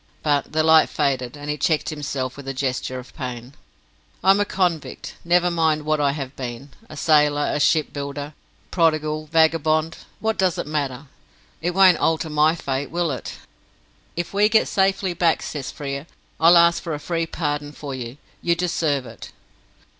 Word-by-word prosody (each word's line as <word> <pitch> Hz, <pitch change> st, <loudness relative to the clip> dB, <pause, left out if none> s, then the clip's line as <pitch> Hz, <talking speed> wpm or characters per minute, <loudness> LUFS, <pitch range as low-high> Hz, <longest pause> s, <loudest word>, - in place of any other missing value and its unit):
But 145 Hz, -2 st, +1 dB
the 155 Hz, 0 st, +1 dB
light 160 Hz, 0 st, +6 dB
faded, 135 Hz, -3 st, -1 dB
and 145 Hz, 0 st, -8 dB
he 150 Hz, 0 st, -2 dB
checked 160 Hz, -5 st, +1 dB
himself 140 Hz, -4 st, -4 dB
with 140 Hz, -1 st, -11 dB
a 135 Hz, -, -4 dB
gesture 130 Hz, -1 st, -2 dB
of 125 Hz, 0 st, -10 dB
pain. 125 Hz, -2 st, -6 dB, 0.7 s
"I 190 Hz, -, +6 dB
am 195 Hz, -, +3 dB
a 205 Hz, -, +2 dB
convict. 180 Hz, -6 st, -2 dB
Never 175 Hz, +1 st, +3 dB
mind 160 Hz, -2 st, +1 dB
what 155 Hz, -1 st, +1 dB
I 140 Hz, -1 st, +2 dB
have 135 Hz, -2 st, -6 dB
been. 125 Hz, +2 st, -7 dB, 0.2 s
A -, -, -10 dB
sailor, 150 Hz, -2 st, +3 dB
a -, -, -1 dB
shipbuilder, 145 Hz, -1 st, -1 dB, 0.4 s
prodigal, 155 Hz, -2 st, +1 dB
vagabond 160 Hz, 0 st, +2 dB, 0.2 s
what 220 Hz, 0 st, -1 dB
does 185 Hz, -3 st, +2 dB
it -, -, -3 dB
matter? 145 Hz, -2 st, -3 dB, 0.6 s
It 175 Hz, +2 st, -2 dB
won't 190 Hz, -2 st, +6 dB
alter 160 Hz, -1 st, 0 dB
my 155 Hz, +2 st, +3 dB
fate, 140 Hz, -3 st, -3 dB
will 170 Hz, -1 st, -1 dB
it?" 130 Hz, -, -5 dB, 0.8 s
"If 175 Hz, +2 st, -4 dB
we 205 Hz, +1 st, +4 dB
get 220 Hz, 0 st, +3 dB
safely 190 Hz, -1 st, +1 dB
back," 170 Hz, -1 st, +1 dB
says 135 Hz, -3 st, -5 dB
Frere, 140 Hz, +2 st, -5 dB, 0.3 s
"I'll 170 Hz, +2 st, +7 dB
ask 170 Hz, 0 st, +5 dB
for 165 Hz, -3 st, -4 dB
a -, -, -6 dB
free 165 Hz, +1 st, -2 dB
pardon 145 Hz, -3 st, -3 dB
for 145 Hz, -2 st, -7 dB
you. 125 Hz, 0 st, -6 dB, 0.2 s
You 170 Hz, 0 st, +2 dB
deserve 160 Hz, -6 st, 0 dB
it." -, -, -11 dB
155 Hz, 175 wpm, -22 LUFS, 140-170 Hz, 0.8 s, I'll